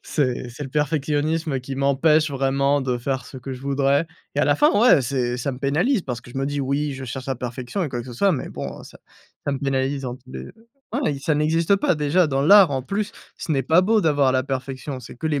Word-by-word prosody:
C'est 130 -4 -1
c'est 130 +5 -8
le 130 - -8
perfectionnisme 150 0 0
qui 135 +1 -6
m'empêche 150 +3 +3
vraiment 140 +1 +1
de 130 -2 -1
faire 130 +2 -2
ce - - -10
que 130 +1 -7
je 125 - -8
voudrais 140 +3 +1 0.3
et - - +1
à - - +3
la - - +3
fin, 300 +1 +5
ouais, 235 - +6
c'est 125 -1 -1
ça 130 +3 -2
me 125 - -8
pénalise 160 - +1
parce 125 -5 -5
que 120 - -14
je 130 - -5
me 135 - -1
dis: 145 0 -2
«Oui, 140 +2 -1
je 130 0 -7
cherche 130 +2 -6
la 135 - -1
perfection 125 - -4
et 165 - -1
quoi 120 - -3
que 120 - -9
ce 125 - -8
soit», 195 +10 +3
mais 140 - -3
bon, - - -6
heu, - - -11
ça - - -14 0.5
ça 145 - -1
me 140 - -2
pénalise 135 0 -1
dans 125 -2 -4
tous 125 0 -19
les - - -6
heu, - - -13 0.4
ouais, 240 - 0
ça 150 +2 0
n'existe 165 +5 +2
pas 185 - +1
déjà 155 +3 +2
dans 135 -2 0
l'art, 195 0 +7
en 135 - -1
plus, 205 - -3 0.2
ce 160 - -3
n'est 135 -2 +1
pas 160 +7 +4
beau 220 +3 +3
d'avoir 145 -6 +3
la 130 0 +2
perfection, 135 0 -5
c'est 120 - -11
que 160 - -4
les 145 -3 0
140 Hz, 260 wpm, -22 LUFS, 130-155 Hz, 0.5 s, l'art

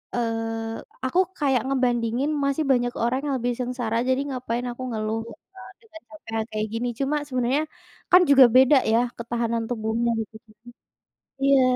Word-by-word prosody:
eee, 225 -1 -2 0.3
aku 260 +8 +1 0.2
kayak 270 -5 +2
ngebandingin 250 0 0 0.2
masih 280 +3 0
banyak 245 -1 +2
orang 245 +3 +1
yang 280 -2 0
lebih 245 +1 -1
sengsara, 245 -2 -2
jadi 260 0 +2
ngapain 250 -3 -3
aku 250 +2 -8
ngeluh 220 0 -2
gitu 230 0 -13
kan 380 - -12 0.2
dengan 325 -6 -13 0.2
capek - - -15
yang 220 0 -1
kayak 215 0 -2
gini. 235 +2 -2
Cuma 275 +2 0
sebenarnya 255 +2 0 0.5
kan 360 - +8
juga 270 -2 +8
beda 265 +3 +7 0.2
ya 230 - +5 0.2
ketahanan 235 -1 -2
tubuhnya 230 0 -1
gitu-gitu. 220 0 -9 0.9
Iya. 275 -1 +5
245 Hz, 160 wpm, -24 LUFS, 225-265 Hz, 0.9 s, kan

